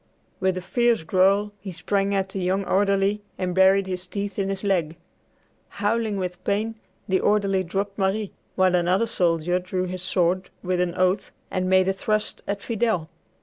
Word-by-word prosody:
With 190 -1 +1
a 185 - -5
fierce 235 -1 +2
growl 195 +4 +3
he 190 0 -7
sprang 200 +3 0
at 190 -1 0
the 190 - -4
young 190 +2 0
orderly 200 +1 +2 0.2
and 180 -1 -2
buried 190 +1 +5
his 185 -1 -4
teeth 200 +1 -4
in 195 0 0
his 195 0 -3
leg. 175 -6 0 0.8
Howling 215 0 0
with 180 -2 -4
pain, 215 +3 0 0.3
the 190 -2 +2
orderly 200 -2 +2
dropped 195 +3 -3
Marie, 195 +1 0 0.2
while 185 -1 +3
another 180 +5 +2
soldier 175 -3 +1
drew 185 0 -2
his 185 0 -5
sword 185 0 +1
with 180 -1 0
an 175 -1 -1
oath 185 +1 +1 0.2
and 185 0 -1
made 185 0 +4
a 195 - +2
thrust 215 +2 -2
at 200 0 -3
Fidel. 220 -8 -1
190 Hz, 175 wpm, -24 LUFS, 185-200 Hz, 0.8 s, buried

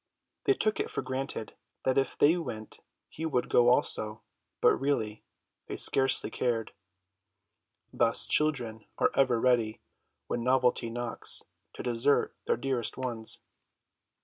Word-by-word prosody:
They 400 - +4
took 215 - 0
it - - -1
for - - -3
granted 130 -3 -4 0.3
that 130 +1 +3
if 135 - -2
they 155 +4 +5
went 120 -11 -6 0.3
he 160 - -8
would 125 -6 -1
go 120 0 +5
also, 110 -2 +1 0.4
but - - +5
really 110 -7 -1 0.4
they - - -4
scarcely 135 -1 +2
cared. 115 -3 -1 1.2
Thus 115 -1 +3
children 120 -8 +1
are 255 - +2
ever 130 -4 +3
ready, 115 -3 +2 0.5
when 120 - -3
novelty 125 -2 +2
knocks, 120 0 0 0.3
to - - -7
desert 125 +4 +1
their - - +2
dearest 130 -3 -2
ones. 120 -4 -3
125 Hz, 130 wpm, -29 LUFS, 115-135 Hz, 1.2 s, they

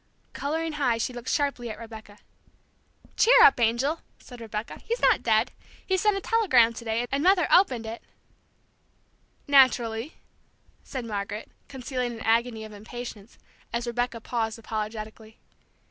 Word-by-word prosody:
Coloring 320 +3 -2
high, 270 -6 +1
she 230 +2 -2
looked 240 +1 -6
sharply 280 -5 -1
at 215 - -6
Rebecca. 220 -2 -11 1.0
"Cheer - - +6
up, 430 - +7
angel," 240 +7 +1 0.2
said 245 -2 -13
Rebecca, 220 0 -6
"he's 470 +2 -2
not - - +4
dead. - - +2 0.3
He 380 - +1
sent 405 +2 +2
a - - -4
telegram 265 - +3
to 230 - -9
day, 230 +1 -1
and 275 +1 0
Mother 370 -1 +4
opened 255 - +4
it 225 +1 -6 0.8
" - - -41
"Naturally," 240 0 +3 0.7
said 260 -4 -6
Margaret, 205 -1 -5 0.2
concealing 255 -2 -4
an 225 - -9
agony 230 0 +1
of 215 - -11
impatience, 220 0 -9 0.3
as 235 +1 -2
Rebecca 240 0 -2
paused 225 -1 -3
apologetically. 220 0 -6
235 Hz, 145 wpm, -26 LUFS, 225-275 Hz, 1.0 s, up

